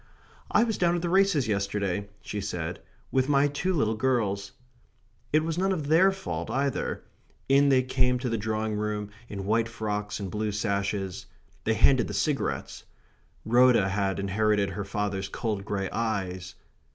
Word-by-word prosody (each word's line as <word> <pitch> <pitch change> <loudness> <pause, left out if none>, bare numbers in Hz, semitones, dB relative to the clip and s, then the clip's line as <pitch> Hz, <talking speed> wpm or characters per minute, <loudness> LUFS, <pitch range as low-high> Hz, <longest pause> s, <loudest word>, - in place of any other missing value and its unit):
"I - - +4
was 225 -3 -1
down 175 -1 +3
at 175 - -2
the 175 - 0
races 190 - +3
yesterday," 100 -1 -1
she 105 - -4
said, 90 -3 -4 0.3
"with 130 +1 +2
my 140 0 +4
two 145 +6 -1
little 110 -11 +1
girls." 105 -5 0 0.8
It 155 +1 +3
was 165 +1 -2
none 195 +1 +2
of 155 -6 -2
THEIR 180 +5 +6
fault 85 - -5
either. 135 0 -1 0.4
In 140 +1 +5
they 130 -1 +4
came 125 -1 +1
to 125 +1 -3
the 115 - 0
drawing 110 0 -1
room, 105 0 -2 0.2
in 100 -2 -5
white 115 +2 +1
frocks 105 -2 -3
and 95 -3 -5
blue 105 -1 -2
sashes. 100 -2 -2 0.4
They 110 - +2
handed 130 +1 +4
the - - -5
cigarettes. 150 -3 -1 0.6
Rhoda 120 -4 +5
had 100 -1 0
inherited 100 0 +1
her 100 0 -4
father's 100 -1 -2
cold 105 -4 -3
grey 100 -2 -2
eyes. 95 -5 -3
110 Hz, 165 wpm, -27 LUFS, 100-135 Hz, 0.8 s, THEIR